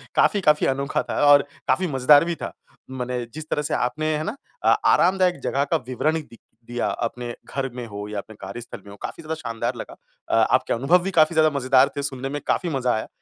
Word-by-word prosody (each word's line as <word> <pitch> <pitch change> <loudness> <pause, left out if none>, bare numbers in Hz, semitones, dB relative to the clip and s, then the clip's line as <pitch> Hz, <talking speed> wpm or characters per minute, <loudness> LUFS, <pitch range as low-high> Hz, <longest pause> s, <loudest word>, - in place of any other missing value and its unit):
काफ़ी-काफ़ी 155 -8 +3
अनोखा 140 +1 0
था - - -1
और 145 0 +8 0.3
काफ़ी 185 -1 +2
मजेदार 145 +2 +5
भी 170 0 -2
था। - - -6 0.4
मने 125 -1 -3
जिस 155 +1 -8
तरह 150 - 0
से 150 - -3
आपने 140 +6 -1
है 155 - -3
ना? 205 +8 -3 0.3
अ, - - +1 0.2
आरामदायक 180 -2 +3
जगह 140 - +1
का 165 - +4
विवरण 155 +5 0
दि 115 -6 -16 0.3
दिया 120 0 -1 0.2
अपने 120 +1 -5 0.2
घर 135 -1 -1
में 125 -1 -5
हो 105 0 -7
या 105 0 -5
अपने 110 +2 -11
कार्यस्थल 120 0 -8
में 100 - -11
हो, - - -10
काफ़ी - - -6
ज़्यादा 160 +1 -3
शानदार 115 -8 -3
लगा। - - -8 0.3
अ, - - +2
आपके - - +2
अनुभव 135 +10 +3
भी 195 - -2
काफ़ी 160 -2 +4
ज़्यादा 155 0 +5
मजेदार 130 0 +4
थे, - - 0
सुनने 135 -1 -4
में 145 +1 -4
काफ़ी 180 - 0
मज़ा 130 -5 0
आया। 110 - -3
140 Hz, 220 wpm, -23 LUFS, 125-155 Hz, 0.4 s, और